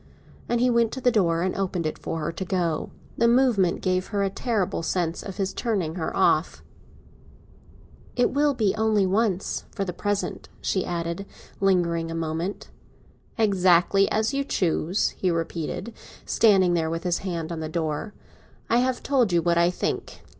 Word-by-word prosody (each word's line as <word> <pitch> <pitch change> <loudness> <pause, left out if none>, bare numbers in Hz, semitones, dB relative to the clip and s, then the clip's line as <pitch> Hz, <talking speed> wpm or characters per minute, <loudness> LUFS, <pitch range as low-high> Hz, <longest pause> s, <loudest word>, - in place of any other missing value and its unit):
And 240 - +1
he 250 +1 +3
went 235 -1 +2
to 260 - -4
the 245 - +4
door 170 -6 +2
and 185 - -1
opened 185 -3 -2
it 155 - -3
for 165 - -4
her 150 - -2
to 165 - -5
go 190 +1 -2
out. 165 -3 -1 0.3
The 235 - +5
movement 235 -7 +3
gave 185 0 0
her 205 -2 -1
a 195 - 0
terrible 210 -4 -1
sense 170 0 -1
of 195 -2 -8
his 195 -2 -1
turning 195 -9 -1
her 165 -2 -3
off. - - +2 1.5
"It 245 -1 +2
will 290 0 +2
be 210 -5 +2
only 220 -2 +2
once, 195 -1 0
for 195 - -3
the 180 - -4
present," 205 +2 -3
she 190 - 0
added, 170 +2 -3 0.3
lingering 170 -4 +1
a 165 - -4
moment. 165 +4 -3 0.7
"Exactly 195 -2 +4
as 220 +4 0
you 280 0 0
choose," 180 - 0
he 185 - -2
repeated, 165 +6 -3 0.3
standing 195 -5 +4
there 165 -2 +1
with 165 +1 -3
his 175 -1 0
hand 170 -4 -4
on 165 - -4
the 155 -1 -4
door. 160 +5 -3 0.6
"I 235 - +5
have 255 0 0
told 255 -8 +2
you 170 -1 +2
what 170 -1 +2
I 170 0 +4
think. 180 - -4
185 Hz, 175 wpm, -25 LUFS, 170-220 Hz, 1.5 s, The